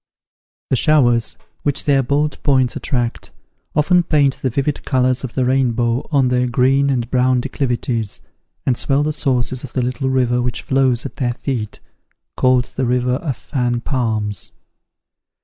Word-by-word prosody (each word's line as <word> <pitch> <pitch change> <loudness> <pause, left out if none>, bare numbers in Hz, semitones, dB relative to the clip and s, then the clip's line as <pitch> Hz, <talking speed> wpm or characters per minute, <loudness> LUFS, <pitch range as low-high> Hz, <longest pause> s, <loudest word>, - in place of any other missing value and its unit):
The - - +4
showers, 120 -5 +2 0.2
which 145 -2 0
their 140 -2 +3
bold 145 +3 -1
points 130 -4 +2
attract, 120 -5 -2 0.5
often 175 +4 +4
paint 145 -5 +2
the 130 - 0
vivid 140 +4 -2
colours 130 0 +1
of 130 - -6
the 130 - +1
rainbow 120 -1 +1
on 135 -4 +3
their 125 0 +1
green 135 +3 +2
and 125 -3 0
brown 130 0 +3
declivities, 120 -4 -2 0.4
and 130 - +2
swell 140 +4 +1
the 155 +1 -1
sources 130 -3 -1
of 135 - -9
the 130 - 0
little 125 +2 -2
river 125 -2 +1
which 125 0 -2
flows 130 -2 +1
at 140 - -7
their 120 -4 -1
feet, 115 -7 -4 0.5
called 130 -1 +3
the 130 - 0
river 125 +1 +1
of 140 -7 -4
Fan 120 -4 -2
Palms. 110 -8 -2
130 Hz, 155 wpm, -19 LUFS, 120-135 Hz, 0.5 s, The